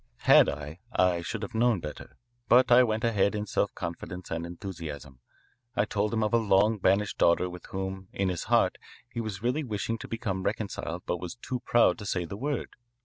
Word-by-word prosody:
Had - - +7
I, 75 +3 -6
I 90 -6 +2
should 110 +5 -4
have 100 - -6
known 115 -2 +3
better. 75 -2 -9 0.3
But 125 +1 +6
I 120 +1 +9
went 110 -2 +1
ahead 105 -3 +2
in 105 0 -2
self - - 0
confidence 90 +1 -6
and 85 +1 -3
enthusiasm. 80 - -7 0.6
I 105 - +2
told 105 0 -1
him 110 -1 +1
of 105 - -1
a - - +6
long 105 0 +3
banished 100 +2 +1
daughter 85 +2 +4
with 90 -1 -9
whom, 95 0 -5
in 95 -1 0
his 90 -3 -3
heart, - - +2 0.3
he 120 -1 -4
was 105 -2 -5
really 125 +6 0
wishing 115 -1 -3
to - - -8
become 110 -5 -3
reconciled 90 -4 -3
but 90 - -2
was 90 +2 -5
too 125 +1 -4
proud 120 -2 +3
to 105 - -6
say 90 -3 -1
the 90 - -6
word. 140 +5 -2
100 Hz, 200 wpm, -28 LUFS, 90-115 Hz, 0.6 s, I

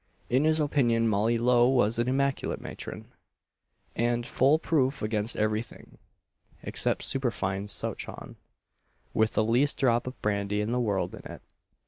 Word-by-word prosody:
In 130 +4 +3
his 160 0 +3
opinion 120 -6 +2
Molly 110 +2 +2
Lowe 120 +1 +4
was 120 -3 +2
an 120 - +1
immaculate 135 +1 0
matron, - - -8 0.9
and 120 +1 0
full 135 +5 +3
proof 140 -5 0
against 105 +1 -1
every 110 0 +1
thing 120 - -15 0.6
except - - 0
superfine 105 -7 -2
souchong, - - -5 0.8
with 110 0 +2
the 110 - +3
least 125 +6 +2
drop 120 -3 +2
of 130 - -7
brandy 100 0 0
in 105 +2 -1
the 125 - 0
world 100 -6 -1
in - - -9
it. - - -11
120 Hz, 145 wpm, -28 LUFS, 110-130 Hz, 0.9 s, Lowe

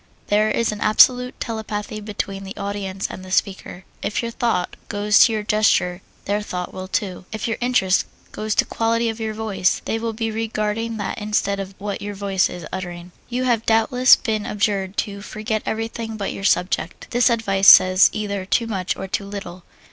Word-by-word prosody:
There 210 +1 +3
is 230 +1 +1
an 210 - -7
absolute 250 +4 +4
telepathy 215 -2 -4
between 200 -2 -4
the 195 0 -8
audience 200 -1 -4
and 185 - -9
the 185 - -10
speaker. 190 -1 -2 0.2
If 215 - -2
your 235 - -3
thought 230 -7 -1
goes 205 0 +3
to 235 - +1
your 215 -1 -2
gesture, 195 -4 +2 0.2
their 205 +1 0
thought 180 -3 -5
will 185 0 -6
too. 185 -1 -3
If 220 +1 -3
your 225 - -2
interest 240 -7 +2 0.2
goes 215 -1 -3
to - - +3
the - - -25
quality 230 +1 +1
of 225 0 -5
your 220 -1 -3
voice, 210 -4 0
they 225 - -1
will 225 0 -3
be 225 0 -2
regarding 220 0 -2
that 205 +1 -4
instead 210 -1 0
of 195 0 -6
what 205 0 -4
your 205 0 -5
voice 195 -1 +1
is 175 -3 -8
uttering. 175 -1 -6 0.2
You 250 +1 -1
have 235 -3 +1
doubtless 235 +3 +5
been 215 -2 -2
adjured 200 -2 -1
to 200 -1 -8
"forget 215 +1 -3
everything 225 0 -3
but 200 -2 -3
your 195 - -6
subject." 180 -3 0
This 245 +1 +4
advice 200 -4 +1
says 185 +1 +8
either 200 -2 -3
too 215 +5 +1
much 195 -5 -2
or 195 - -5
too 200 +1 -2
little. 195 -3 -8
210 Hz, 195 wpm, -21 LUFS, 195-225 Hz, 0.2 s, says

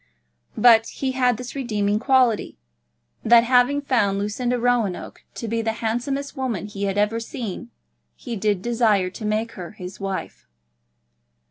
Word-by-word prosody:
But 230 -2 +6
he 265 +2 -3
had 250 -3 +2
this 250 +1 -7
redeeming 210 -6 -1
quality, 250 - +2 0.7
that 230 +1 +6
having 250 +4 +3
found 220 -8 +1
Lucinda 240 +5 -1
Roanoke 235 -6 -1
to 230 - -5
be 230 +1 -1
the 225 0 -1
handsomest 245 +6 -3
woman 250 - -3
he 200 -1 -4
had 195 0 -2
ever 210 +2 +1
seen, 230 -1 -6 0.5
he 240 -3 -6
did 205 -2 0
desire 220 -6 +2
to 215 - -7
make 215 +2 -1
her 180 +1 -9
his 185 -3 -9
wife. 195 -1 -5
230 Hz, 145 wpm, -23 LUFS, 205-245 Hz, 0.7 s, But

